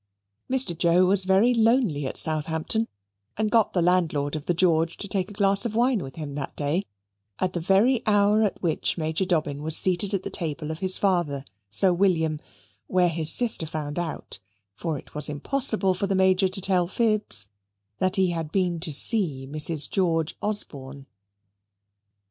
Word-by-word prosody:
Mr. 255 Hz, -9 st, +3 dB
Joe 175 Hz, +2 st, +2 dB
was 190 Hz, 0 st, +3 dB
very 195 Hz, +6 st, +3 dB
lonely 225 Hz, -, +1 dB
at -, -, -5 dB
Southampton, 160 Hz, +8 st, +1 dB, 0.5 s
and 215 Hz, 0 st, -1 dB
got 225 Hz, -3 st, +2 dB
the 175 Hz, -, 0 dB
landlord 160 Hz, -5 st, 0 dB
of 155 Hz, -1 st, -7 dB
the 175 Hz, -, +1 dB
George 165 Hz, -2 st, +1 dB
to 200 Hz, -, -4 dB
take 190 Hz, 0 st, -1 dB
a -, -, -11 dB
glass 200 Hz, -1 st, +2 dB
of 230 Hz, -3 st, -4 dB
wine 245 Hz, 0 st, +1 dB
with 135 Hz, -3 st, -9 dB
him 150 Hz, -3 st, -7 dB
that 140 Hz, -1 st, -6 dB
day, 155 Hz, +7 st, -2 dB, 0.5 s
at 185 Hz, 0 st, -2 dB
the 175 Hz, -, -3 dB
very 200 Hz, +8 st, +2 dB
hour 205 Hz, 0 st, +3 dB
at 210 Hz, -3 st, -1 dB
which 165 Hz, 0 st, -1 dB
Major 160 Hz, +3 st, -2 dB
Dobbin 155 Hz, -5 st, -2 dB
was 155 Hz, +1 st, +4 dB
seated 190 Hz, +2 st, +2 dB
at 190 Hz, -, -4 dB
the -, -, -6 dB
table 155 Hz, -2 st, -4 dB
of 160 Hz, -, -7 dB
his 185 Hz, 0 st, +4 dB
father, 170 Hz, -8 st, -1 dB, 0.2 s
Sir 180 Hz, -, +3 dB
William, 165 Hz, -5 st, 0 dB, 0.5 s
where 180 Hz, -1 st, +1 dB
his 160 Hz, -1 st, +2 dB
sister 225 Hz, -9 st, +4 dB
found 150 Hz, 0 st, -5 dB
out 170 Hz, -2 st, -6 dB, 0.3 s
(for 160 Hz, -, -4 dB
it -, -, -14 dB
was 150 Hz, 0 st, 0 dB
impossible 210 Hz, -, 0 dB
for 190 Hz, +2 st, -3 dB
the 195 Hz, -, -1 dB
Major 190 Hz, 0 st, +2 dB
to 190 Hz, +1 st, -1 dB
tell 180 Hz, -2 st, +1 dB
fibs) 215 Hz, -, -1 dB, 0.5 s
that 185 Hz, +1 st, 0 dB
he 190 Hz, -3 st, +1 dB
had 165 Hz, -2 st, -5 dB
been 180 Hz, -3 st, -1 dB
to 160 Hz, -1 st, -2 dB
see 150 Hz, -, +3 dB
Mrs. 150 Hz, 0 st, +1 dB
George 165 Hz, -4 st, -1 dB
Osborne. 140 Hz, -10 st, -4 dB
180 Hz, 180 wpm, -24 LUFS, 155-200 Hz, 0.5 s, was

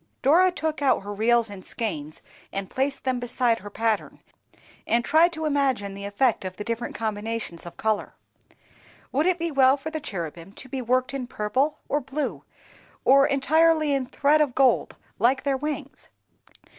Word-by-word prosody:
Dora 350 Hz, +7 st, +5 dB
took 315 Hz, -3 st, -3 dB
out 265 Hz, -7 st, +2 dB
her 205 Hz, +1 st, -5 dB
reels 230 Hz, +2 st, +2 dB
and 200 Hz, -3 st, -9 dB
skeins, 155 Hz, -10 st, -5 dB, 0.3 s
and 195 Hz, -1 st, -5 dB
placed 270 Hz, +1 st, -1 dB
them 255 Hz, -2 st, 0 dB
beside 245 Hz, -1 st, +1 dB
her 205 Hz, -, -9 dB
pattern, 220 Hz, +1 st, -1 dB, 0.7 s
and 235 Hz, +1 st, +2 dB
tried 330 Hz, +3 st, +5 dB
to 315 Hz, -1 st, -4 dB
imagine 270 Hz, -9 st, 0 dB
the 200 Hz, 0 st, -7 dB
effect 205 Hz, +3 st, +1 dB
of 185 Hz, 0 st, -6 dB
the 210 Hz, -, -4 dB
different 230 Hz, +2 st, -4 dB
combination 220 Hz, -4 st, -3 dB
of 175 Hz, -, -10 dB
color. 215 Hz, -1 st, -1 dB, 1.0 s
Would 295 Hz, +6 st, +1 dB
it 370 Hz, -1 st, +2 dB
be 335 Hz, -1 st, -2 dB
well 270 Hz, -1 st, +5 dB
for 310 Hz, +3 st, -6 dB
the 315 Hz, -, -3 dB
cherubim 170 Hz, -, -6 dB
to 260 Hz, -, -11 dB
be 260 Hz, 0 st, -4 dB
worked 255 Hz, +2 st, 0 dB
in 260 Hz, -3 st, -4 dB
purple 255 Hz, +8 st, -1 dB
or 290 Hz, -, 0 dB
blue, 275 Hz, +3 st, -4 dB, 0.6 s
or 275 Hz, +1 st, +6 dB
entirely 310 Hz, +2 st, +3 dB
in 270 Hz, -2 st, -1 dB
thread 295 Hz, +4 st, +3 dB
of 280 Hz, -5 st, 0 dB
gold, 260 Hz, -3 st, +3 dB, 0.2 s
like 255 Hz, +5 st, +2 dB
their 280 Hz, -1 st, +1 dB
wings? 295 Hz, +2 st, -5 dB
255 Hz, 170 wpm, -25 LUFS, 215-285 Hz, 1.0 s, or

